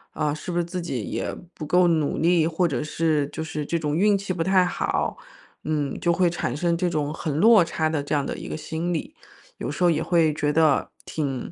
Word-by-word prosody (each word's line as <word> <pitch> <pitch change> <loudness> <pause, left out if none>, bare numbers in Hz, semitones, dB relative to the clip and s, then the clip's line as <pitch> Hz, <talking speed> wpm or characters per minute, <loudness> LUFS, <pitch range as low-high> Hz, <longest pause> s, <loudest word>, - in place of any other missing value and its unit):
呃， 150 -2 0
是 155 +4 -6
不 175 - -2
是 170 - +1
自 180 +1 -4
己 130 -10 -3
也 - - -3 0.2
不 155 - -8
够 180 +1 +4
努 155 -4 +1
力， 165 0 +3
或 170 +2 +1
者 130 -6 -2
是， 155 -2 0
就 160 - -5
是 155 -1 -4
这 170 +3 -1
种 150 -2 -2
运 200 +3 +4
气 195 -1 -3
不 170 -2 -1
太 185 0 +4
好。 180 - -1 0.5
嗯， 150 -3 -1
就 170 -1 +2
会 180 0 +3
产 175 - -3
生 170 +2 0
这 180 0 0
种 150 -3 -1
很 155 -3 -3
落 215 -1 +7
差 160 -1 -1
的， 155 -2 -1
这 145 - -4
样 145 -2 +2
的 - - -3
一 - - -7
个 - - -4
心 160 +3 -3
理。 300 - -4 0.4
有 - - -4
时 - - -2
候 175 - +6
也 160 -2 +1
会 165 -3 +3
觉 150 -1 0
得 155 -3 +3
挺 140 -5 -3
160 Hz, 255 characters per minute, -24 LUFS, 150-175 Hz, 0.5 s, 落